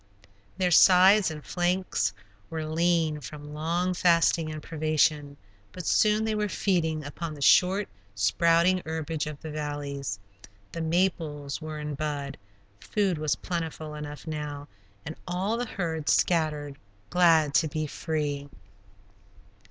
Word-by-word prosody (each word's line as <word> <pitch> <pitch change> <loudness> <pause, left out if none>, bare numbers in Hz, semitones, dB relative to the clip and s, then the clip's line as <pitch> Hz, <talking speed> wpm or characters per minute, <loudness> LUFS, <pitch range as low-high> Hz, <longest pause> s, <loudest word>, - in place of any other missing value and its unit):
Their 185 -1 +1
sides 190 +3 +7
and 150 -2 -8
flanks 180 +1 0 0.4
were 160 -1 -4
lean 160 -1 +1
from 150 +2 -9
long 170 +4 -1
fasting 170 -2 +3
and 155 0 -7
privation, 155 -2 0 0.4
but 180 -2 -7
soon 215 0 +3
they 220 - 0
were 210 -1 -1
feeding 165 -4 0
upon 155 +2 -6
the 145 - -11
short, 190 +6 +4 0.3
sprouting 170 - +3
herbage 160 -1 -3
of 150 -2 -7
the 160 - -6
valleys. 145 -6 -4 0.5
The 165 - -5
maples 160 -4 -1
were 155 -1 -6
in 150 0 -4
bud; 145 -3 -4 0.4
food 190 - -1
was 155 -1 0
plentiful 160 -3 -5
enough 150 -2 -8
now, 150 -2 -5 0.4
and 160 - -6
all 185 +5 -1
the 245 +1 -3
herd 165 -7 -3
scattered, 150 -4 +1 0.3
glad 165 -5 +4
to 155 +2 +3
be 155 0 -3
free. 145 -2 -3
160 Hz, 130 wpm, -27 LUFS, 150-175 Hz, 0.5 s, sides